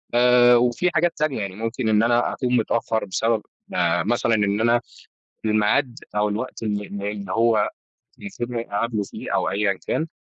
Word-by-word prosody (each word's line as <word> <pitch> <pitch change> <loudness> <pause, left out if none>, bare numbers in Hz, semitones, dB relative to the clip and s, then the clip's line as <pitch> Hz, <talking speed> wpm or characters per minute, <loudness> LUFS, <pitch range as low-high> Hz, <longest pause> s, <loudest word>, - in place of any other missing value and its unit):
آآ، 125 0 +6
وفيه 120 +9 +2
حاجات 170 +2 +3
تانية 150 -5 0
يعني 100 -2 -5
ممكن 115 +2 -2
إن 110 0 +4
أنا 120 +1 +2
أكون 125 -1 -1
متأخر 115 -1 0
بسبب 110 +3 0 0.3
آآ، 85 -1 +2
مثلًا 115 +2 +1
إن 105 0 +1
أنا 120 +1 +3 0.6
الميعاد 110 +3 +1 0.2
أو 105 0 +2
الوقت 115 +3 -4
إن 105 -2 -1
إن 100 0 -7
إن 100 0 -5
هو 115 -2 +2 0.5
المفوض 130 -12 -6
إني 115 -4 -4
أقابله 110 0 -1
فيه - - -7
أو - - +1
أيًا 100 0 +1
كان 160 - -1
115 Hz, 170 wpm, -23 LUFS, 105-120 Hz, 0.6 s, آآ